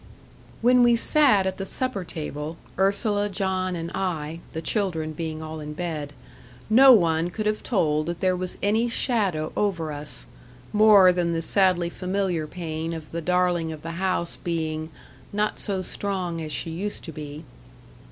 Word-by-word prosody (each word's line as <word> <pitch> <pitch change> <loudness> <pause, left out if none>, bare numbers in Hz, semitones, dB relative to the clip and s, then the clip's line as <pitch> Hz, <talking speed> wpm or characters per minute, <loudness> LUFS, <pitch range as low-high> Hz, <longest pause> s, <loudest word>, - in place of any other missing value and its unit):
When 250 +1 +6
we 240 -1 +6
sat 230 -5 +4
at 190 0 -2
the 195 - -3
supper 255 -5 -2
table 155 -1 -5 0.2
Ursula, 205 +1 +1
John, 190 -2 -1
and 165 0 -5
I, 165 -4 -3
the 160 - -4
children 165 -3 -1
being 160 0 -5
all 155 0 -6
in 150 0 -6
bed 155 -3 -4 0.6
no 265 +4 +9
one 170 -6 +4
could 215 +4 -4
have 215 0 0
told 155 -9 +1
that 170 0 -3
there 185 -1 +2
was 180 0 -5
any 220 +4 +2
shadow 200 - 0
over 170 -7 0
us, 145 - -7 0.5
more 210 -3 +7
than 175 -1 0
the 165 - -1
sadly 180 -1 +2
familiar 185 -4 -1
pain 165 -1 -4
of 160 -2 -8
the 170 - -3
darling 175 -1 +1
of 155 -1 -9
the 165 - -4
house 185 -2 -1
being 160 -2 -2 0.4
"not 210 +1 -1
so 195 -3 -2
strong 180 -3 -3
as 155 -1 -5
she 165 +3 -2
used 200 +6 -4
to 165 - -7
be." 150 0 -8
175 Hz, 165 wpm, -25 LUFS, 160-200 Hz, 0.6 s, no